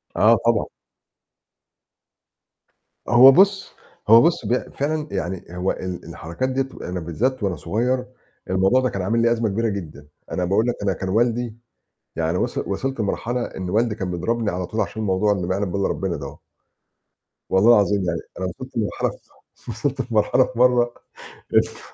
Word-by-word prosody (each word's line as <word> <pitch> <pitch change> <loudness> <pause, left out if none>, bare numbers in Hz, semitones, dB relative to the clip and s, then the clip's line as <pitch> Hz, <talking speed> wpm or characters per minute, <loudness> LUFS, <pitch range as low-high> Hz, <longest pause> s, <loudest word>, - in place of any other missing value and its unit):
آه، - - +5
طبعًا. - - +2 2.4
هو 125 +3 +9
بُص 195 +4 +3 0.3
هو 115 +2 +8
بُص 165 -8 +1
بق 120 +4 -1
فعلًا 150 +2 -2
يعني 90 +1 -3
هو 90 +2 0
ال 90 -1 -6
الحركات 85 +12 -4
دِيّة 130 +1 0
تبقى 130 - -9
أنا 90 0 -3
بالذّات 115 +10 -2
وأنا 95 -3 0
صغيّر 120 +10 -1 0.4
الموضوع 95 +7 +3
ده 130 - +1
كان 100 - -4
عامل 110 +5 +1
لي 115 0 +3
أزمة 115 -2 +1
كبيرة 115 +3 0
جدًا، 80 -8 -7 0.2
أنا 90 - -1
باقول 105 +6 +1
لك 120 - 0
أنا 100 -1 +1
كان 95 +1 -5
والدي 120 +2 0 0.6
يعني 80 +2 0
وص - - -2
وصلت 130 +6 -3
لمرحلة 120 +4 -2
إن 90 -1 -6
والدي 115 +1 +1
كان 95 -4 -4
بيضربني 110 +6 -1
على 90 0 -3
طول 110 - -3
عشان 110 - -3
الموضوع 105 +1 +2
اللي 90 -3 -2
ما 95 - 0
يعلم 100 -2 -2
بيه 100 - -2
الّا 100 - +1
ربنا 95 -3 -2
دهو. 70 -2 -8 1.1
والله 95 +5 +4
العظيم 100 -2 +2
يعني 85 -1 -1 0.2
أنا 95 - -2
وصلت 130 +9 -7
لمرحلة 105 -3 -1 0.4
ف - - -15
وصلت 120 +2 -3
لمرحلة 110 +4 +3
في 120 - -8
مرّة 125 -1 +4 0.6
لف - - 0
105 Hz, 170 wpm, -22 LUFS, 95-120 Hz, 2.4 s, هو